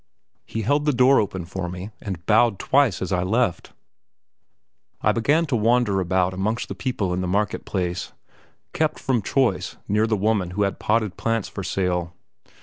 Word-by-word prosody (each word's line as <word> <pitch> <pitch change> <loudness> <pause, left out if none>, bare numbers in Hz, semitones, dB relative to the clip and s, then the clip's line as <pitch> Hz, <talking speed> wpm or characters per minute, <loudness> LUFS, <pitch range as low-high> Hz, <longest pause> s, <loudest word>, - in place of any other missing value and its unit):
He 110 - -3
held 145 +6 +1
the 150 - +3
door 130 +2 +5
open 95 -4 -2
for 90 0 -4
me, 90 +4 -7
and 95 -4 -6
bowed 110 -1 +4
twice 135 -8 +2
as 95 - -4
I 90 -2 +1
left. 100 -1 0 1.3
I - - +3
began 150 +9 +2
to 145 -5 -1
wander 115 -2 +2
about 90 0 +1
amongst 105 +5 -2
the - - -3
people 105 -9 -2
in 90 - -1
the 90 - -2
market 100 +3 -1
place, 90 -2 -3 0.6
kept 155 0 0
from 125 -4 0
choice 95 -5 0
near 105 +2 +2
the 110 -1 +1
woman 100 -3 +1
who 105 - +3
had 100 - -2
potted 105 -4 0
plants 115 -3 -1
for 95 - -6
sale. 90 -2 -1
105 Hz, 175 wpm, -23 LUFS, 90-115 Hz, 1.3 s, door